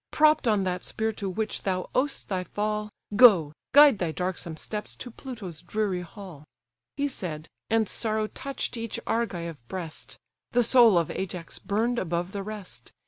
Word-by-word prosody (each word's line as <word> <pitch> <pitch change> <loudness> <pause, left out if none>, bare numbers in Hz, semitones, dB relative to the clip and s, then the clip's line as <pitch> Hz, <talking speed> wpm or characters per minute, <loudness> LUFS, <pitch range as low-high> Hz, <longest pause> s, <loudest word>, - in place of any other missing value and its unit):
Propp'd 305 -4 +4
on 210 -3 +3
that 180 -1 -2
spear 220 0 -2
to 200 -2 -4
which 215 +3 -2
thou 185 -2 -1
owest 275 +2 0
thy 185 -2 -1
fall, 210 +2 -2 0.3
Go, 195 -11 +7 0.2
guide 285 -6 +8
thy 175 -3 0
darksome 175 -2 -3
steps 210 +5 -5
to 245 - -8
Pluto's 220 - -8
dreary 190 0 -1
hall." 180 -5 -10 0.5
He 285 0 +1
said, 165 - -5 0.2
and 225 -1 +3
sorrow 215 0 0
touch'd 270 +3 -4
each 230 -1 -4
Argive 170 - -2
breast: 175 -4 -6 0.4
The 245 0 +4
soul 235 -4 +6
of 165 -2 +1
Ajax 180 -3 -5
burn'd 225 +5 0
above 175 +1 -2
the 200 - -4
rest. 195 - -7
205 Hz, 160 wpm, -27 LUFS, 180-230 Hz, 0.5 s, guide